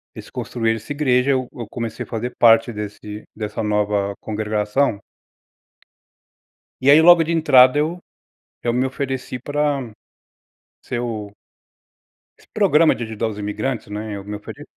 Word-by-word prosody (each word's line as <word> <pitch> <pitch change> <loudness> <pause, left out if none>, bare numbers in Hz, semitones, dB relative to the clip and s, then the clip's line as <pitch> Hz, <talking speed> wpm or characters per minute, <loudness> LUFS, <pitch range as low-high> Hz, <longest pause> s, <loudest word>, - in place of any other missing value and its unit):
Eles - - -10
construíram 115 -1 -2
essa 110 +6 -10
igreja, 140 -2 +2
eu 130 -2 0
eu 120 -3 -7
comecei 115 -2 -5
a - - -14
fazer 120 +2 -4
parte 115 +1 +5
desse 105 0 -7
dessa 105 0 -4
nova 105 -1 0
congregação. 105 +2 -1 1.8
E 135 - +5
aí, 150 - +8
logo 170 -1 +7
de 165 - -2
entrada 130 -5 +6
eu 160 +4 0 0.6
eu 120 - 0
me 125 +2 +1
ofereci 130 -2 -4
pra 145 -1 -1 0.9
ser 120 - -4
o 110 -4 -5 1.1
Esse - - -22
programa 165 -6 +4
de - - -7
ajudar 110 0 -3
os 105 -1 -7
imigrantes, 105 +4 -3
né? 105 +1 -5
Eu 100 - -8
me 105 0 -5
ofere. 105 - -10
120 Hz, 145 wpm, -21 LUFS, 105-135 Hz, 1.8 s, aí